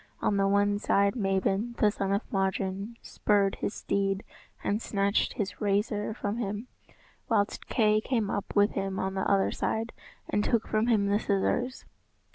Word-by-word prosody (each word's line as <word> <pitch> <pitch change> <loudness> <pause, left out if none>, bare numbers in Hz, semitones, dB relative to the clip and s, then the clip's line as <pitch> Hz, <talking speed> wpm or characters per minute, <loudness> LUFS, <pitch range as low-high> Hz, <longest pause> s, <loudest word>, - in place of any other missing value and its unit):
On 205 - +1
the 195 0 +3
one 205 +1 +2
side, 200 -1 +2
Mabon, 195 +2 0
the 210 - +4
son 195 -2 -2
of 200 +2 +1
Modron, 195 +2 -1
spurred 200 -2 +1
his 205 - -3
steed 195 -1 -1 0.4
and 210 +2 0
snatched 200 -1 +1
his 205 -2 -4
razor 210 +1 0
from 205 -1 -3
him, 210 +1 -3 0.6
whilst 205 -3 0
Kay 215 -2 +3
came 225 -3 0
up 200 - -4
with 205 +1 +4
him 195 -1 -2
on 190 0 -1
the 190 - -1
other 195 -1 +3
side 225 +1 -2 0.3
and 205 - 0
took 230 0 +1
from 215 +2 +1
him 215 -4 +3
the 200 +1 +2
scissors. 225 +5 0
205 Hz, 165 wpm, -29 LUFS, 195-215 Hz, 0.6 s, the